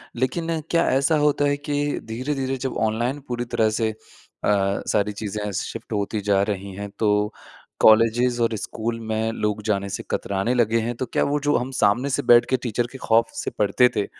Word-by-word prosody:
लेकिन 160 +6 -1
क्या 170 - +2
ऐसा 135 +4 +3
होता 145 0 +2
है 145 - 0
कि 145 0 -2
धीरे-धीरे 130 +3 -3
जब 130 0 -3
ऑनलाइन 120 +6 -2
पूरी 120 0 -3
तरह 115 -2 +1
से 110 -1 +1
अ, 110 - -17 0.9
सारी 105 0 +1
चीज़ें 105 0 -4
शिफ्ट 115 +4 -5
होती 105 +1 -1
जा 100 -1 +2
रही 100 -1 -3
हैं 100 +1 -6
तो, 105 0 +1 0.5
कॉलेजेज़ 115 +2 +4
और 115 -1 +1
स्कूल 115 +3 -4
में 110 +1 0
लोग 105 -1 -1
जाने 100 -2 0
से - - -4
कतराने 100 +5 -1
लगे 115 -2 +2
हैं। 120 +2 -2
तो 130 - -3
क्या - - 0
वो 145 +1 0
जो 145 - +3
हम 125 +2 -3
सामने 120 +7 +2
से - - 0
बैठ 120 0 +6
के 130 - +2
टीचर 120 0 -1
के 135 - -8
खौफ 115 -2 +2
से - - -3
पढ़ते 105 +5 +4
थे 105 - +1
115 Hz, 195 wpm, -23 LUFS, 105-130 Hz, 0.9 s, बैठ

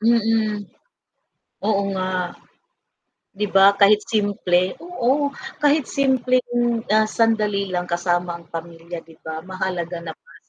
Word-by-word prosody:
Mm, 220 -2 +2 1.1
oo 200 -1 +2
nga. 185 0 -1 1.3
'Di 210 +1 -1
ba, 195 0 +8
kahit 210 +1 +6
simple, 190 -4 +1
oo, 285 -4 0 0.3
kahit 295 -1 +3
simpleng, 245 -3 +1
ah, 215 0 +4
sandali 210 -4 +1
lang 180 -1 -2
kasama 175 0 0
ang 170 - -18
pamilya, 165 +1 -7
'di 160 0 -18
ba? 160 0 -5
Mahalaga 180 -2 -3
na 160 -1 -6
para - - -22
205 Hz, 120 wpm, -22 LUFS, 175-235 Hz, 1.3 s, ba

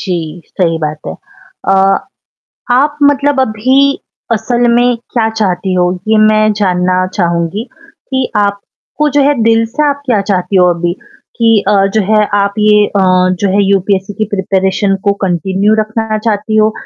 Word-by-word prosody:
जी, 170 -3 -4
सही 165 -3 -1
बात 150 0 -4
है। 80 - -4 0.6
अ, 195 0 +3 0.7
आप 290 +4 +1
मतलब 285 -1 +2
अभी 260 +4 +1 0.3
असल 240 +2 0
में 245 0 +2 0.2
क्या 225 -2 +1
चाहती 195 -3 -2
हो, 180 0 +1 0.2
ये 220 0 +3
मैं 215 0 +3
जानना 185 -2 0
चाहूँगी 170 +3 -1 0.5
कि 260 -1 -1
आप 200 -1 0 0.4
को 300 0 +2
जो 290 - +2
है 290 +1 +3
दिल 225 0 +3
से 240 +7 -3
आप 285 0 -2
क्या 230 -6 +1
चाहती 195 -1 -1
हो 180 -1 +5
अभी? 175 0 -2 0.4
कि 225 -2 +3
अ, - - +3 0.2
जो 220 - +3
है 215 -1 +4 0.2
आप 200 0 -1
ये 210 0 +4
अ, 200 - -2 0.4
जो 200 - +1
है 200 +2 +2
यूपीएससी 195 0 0
की 215 +2 -1
प्रिपरेशन 190 +1 0
को 200 - +3
कंटिन्यू 190 +4 0
रखना 215 0 -2
चाहती 215 0 -2
हो, 215 0 +3
210 Hz, 165 wpm, -12 LUFS, 190-225 Hz, 0.7 s, हो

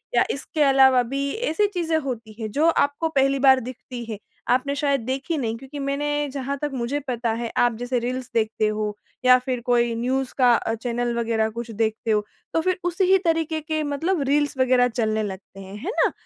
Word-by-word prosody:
या - - +5
इसके 300 +2 -3
अलावा 265 -2 +6
भी 275 +3 -2 0.2
ऐसी 415 +6 +2
चीज़ें 340 -5 -1
होती 240 -7 -5
हैं, 220 -1 -3
जो 300 +8 +2
आपको 320 0 +1
पहली 275 -2 +2
बार 265 -1 +6
दिखती 250 0 -8
है, 215 - -4 0.3
आपने 260 +3 +1
शायद 280 -2 +1
देखी 265 +5 -2
नहीं 230 -5 -2
क्योंकि 270 +4 -9
मैंने 290 +1 -1
जहाँ 275 0 -3
तक 295 -1 -2
मुझे 255 +3 -2
पता 240 -2 -1
है, 230 0 -4
आप 240 -1 +3
जैसे 245 +1 -1
रील्स 250 +1 -4
देखते 220 -1 +1
हो 210 -1 -2 0.3
या 255 0 +8
फिर 250 -1 -3
कोई 240 -1 +2
न्यूज़ 255 +3 -1
का 250 -2 +5
अ, 225 - -1
चैनल 240 +1 -2
वगैरह 225 -1 +1
कुछ 235 +1 -6
देखते 220 +1 -1
हो, 210 -1 +1 0.3
तो 325 - +2
फिर 370 +2 0
उसी 355 +2 0
ही 385 - +7
तरीके 325 -1 0
के 310 0 -2
मतलब 300 +4 -1
रील्स 290 0 +1
वगैरह 255 -1 +4
चलने 220 -3 -1
लगते 195 -1 -8
हैं। 195 +1 -9
है - - -2 0.2
ना? - - +1
255 Hz, 205 wpm, -23 LUFS, 235-285 Hz, 0.3 s, या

